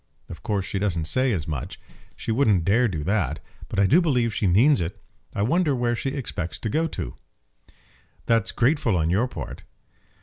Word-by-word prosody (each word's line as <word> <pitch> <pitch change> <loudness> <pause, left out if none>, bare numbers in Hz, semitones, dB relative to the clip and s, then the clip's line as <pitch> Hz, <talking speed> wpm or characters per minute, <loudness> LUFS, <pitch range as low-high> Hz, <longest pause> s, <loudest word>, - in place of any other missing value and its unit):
Of - - -9
course 105 -5 -1
she 95 - -3
doesn't 85 -6 -1
say 130 +9 +1
as 85 -7 -2
much. 75 -5 -5 0.4
She - - -4
wouldn't 110 -8 +3
dare 115 +6 +4
do 80 -8 -3
that, 100 +1 0 0.3
but - - -5
I 100 - +5
do 160 - +5
believe 125 -9 +1
she 100 - 0
means 120 +10 +4
it. 90 +5 -4 0.4
I 100 - 0
wonder 150 - +2
where 120 -1 0
she 135 - -2
expects 125 - -4
to 110 - -4
go 160 +9 +1
to!" 65 - -5 1.1
"That's 115 -2 +2
grateful 120 - +2
on 80 0 +1
your 105 +8 +2
part." - - -7
110 Hz, 190 wpm, -24 LUFS, 90-130 Hz, 1.1 s, I